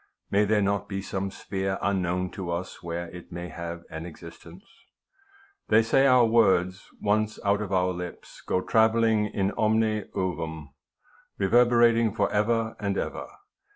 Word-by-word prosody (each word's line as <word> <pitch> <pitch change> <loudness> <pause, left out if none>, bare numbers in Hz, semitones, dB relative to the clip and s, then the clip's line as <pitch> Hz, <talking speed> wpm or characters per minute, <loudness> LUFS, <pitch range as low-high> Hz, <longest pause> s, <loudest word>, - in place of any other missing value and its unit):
May 105 +1 +3
there 105 0 +2
not 100 +1 -1
be 100 -1 -3
some 95 0 -3
sphere 95 0 -3
unknown 90 -2 -1
to 95 -3 -6
us 85 +2 -4
where 85 0 -5
it 90 -1 -11
may 85 +1 -6
have 85 0 -7
an 80 +1 -6
existence? 85 - -12 1.0
They 110 +1 +5
say 135 +4 +3
our 125 -2 +6
words, 95 -5 +2
once 105 +1 0
out 100 +1 +2
of 100 -2 -5
our 90 -1 +1
lips, 90 0 -8
go 90 - 0
travelling 110 0 +3
in 100 -1 -1
omne 110 -1 +1
cevum, 80 -4 -4 0.7
reverberating 115 +1 +4
for 100 -1 +1
ever 110 +2 0
and 100 -2 -2
ever. - - -4
100 Hz, 150 wpm, -26 LUFS, 90-110 Hz, 1.0 s, our